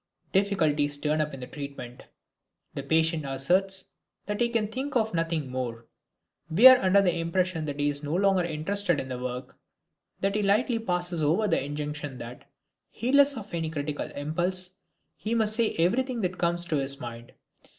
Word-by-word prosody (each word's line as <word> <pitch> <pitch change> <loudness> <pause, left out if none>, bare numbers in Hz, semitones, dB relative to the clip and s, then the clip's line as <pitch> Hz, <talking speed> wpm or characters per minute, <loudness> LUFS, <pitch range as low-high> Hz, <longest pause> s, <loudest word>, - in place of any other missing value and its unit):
Difficulties 155 -8 +1
turn 150 +1 0
up 150 0 -2
in 135 - -9
the - - -5
treatment. 135 -3 -9 0.7
The - - -4
patient 160 +2 +1
asserts 180 +9 +1 0.4
that 210 +3 -3
he 235 - +3
can 230 -3 0
think 260 +6 -5
of 220 -3 +1
nothing 165 -5 -1
more. 120 -3 -4 0.6
We 185 +10 +4
are 260 -1 +10
under 195 +1 +4
the 180 -3 +2
impression 170 0 -1
that 145 -1 -5
he 145 - +1
is 145 0 -1
no 150 +2 -3
longer 195 -1 +3
interested 175 +2 0
in 130 - -5
the 125 -1 -4
work, 125 0 -6 0.6
that 195 0 0
he 210 - 0
lightly 220 +4 +2
passes 175 -5 -2
over 170 +9 +2
the 165 -7 +1
injunction 145 -1 -5
that, 120 +1 -10 0.4
heedless 280 +3 +3
of 210 -3 -9
any 165 -2 -2
critical 150 -1 -4
impulse, 175 +5 -1 0.5
he 225 +2 -2
must 215 -1 +2
say 230 -1 +2
everything 235 +8 +1
that 185 -1 -2
comes 175 0 0
to 165 -4 -1
his 140 0 -1
mind. 120 -2 -9
170 Hz, 175 wpm, -27 LUFS, 145-200 Hz, 0.7 s, are